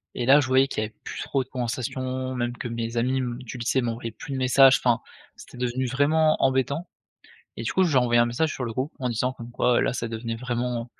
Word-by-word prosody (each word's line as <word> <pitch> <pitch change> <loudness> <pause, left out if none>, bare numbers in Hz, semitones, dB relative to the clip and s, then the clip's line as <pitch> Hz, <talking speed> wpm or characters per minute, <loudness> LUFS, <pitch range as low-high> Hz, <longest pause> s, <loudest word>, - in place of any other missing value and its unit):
et 120 - -2
là, 135 +4 +7
je 130 - 0
voyais 130 +1 +4
qu'il 110 - -2
y - - -1
avait 110 - -20
plus - - -6
trop 135 -2 -1
de 130 - -25
conversations, 130 +1 -3
même 120 0 -2
que 120 - -4
mes 115 0 -4
amis, 130 +3 +1
mmh, 120 0 -4
du 125 +1 -8
lycée 125 +2 0
m'envoyaient 115 -1 -3
plus 135 +5 -8
de - - -2
messages. 130 +1 +6
Enfin, 120 -1 +2 0.3
c'était - - -13
devenu 125 +1 -1
vraiment 155 +4 +3
embêtant 135 +6 +1 0.7
et 115 - -4
du - - -2
coup, 190 - +4
j'ai 150 -7 +2
envoyé 120 -1 +3
un - - +4
message 155 +7 0
sur 130 - -5
le 115 - -3
groupe 130 +7 -3
en 125 -1 -1
disant 125 +3 -1
comme 120 -1 -10
quoi 125 0 +2
là - - +1
ça 115 -1 -3
devenait 115 0 -4
vraiment, 120 -1 -2
heu, - - -11
125 Hz, 250 wpm, -25 LUFS, 120-130 Hz, 0.7 s, là